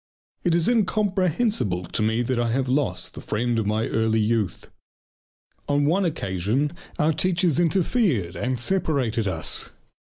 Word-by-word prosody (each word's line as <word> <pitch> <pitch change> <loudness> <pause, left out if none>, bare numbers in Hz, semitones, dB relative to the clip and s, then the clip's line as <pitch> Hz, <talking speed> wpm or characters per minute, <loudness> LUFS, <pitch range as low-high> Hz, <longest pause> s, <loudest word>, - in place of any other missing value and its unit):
It 175 -2 +2
is 170 -1 +2
incomprehensible 200 - +1
to - - -3
me 110 +2 +1
that 120 0 -1
I 120 -1 +1
have 130 +3 0
lost 125 -10 -1
the - - -9
friend 115 +2 -1
of 105 - -1
my 110 +2 0
early 110 0 +1
youth. 110 -2 -1 1.0
On 145 0 +2
one 180 +6 +2
occasion 125 - -1 0.2
our 155 +2 +2
teachers 175 -1 +1
interfered 170 - +1
and 130 0 -1
separated 125 - 0
us. 95 - 0
130 Hz, 140 wpm, -24 LUFS, 110-175 Hz, 1.0 s, It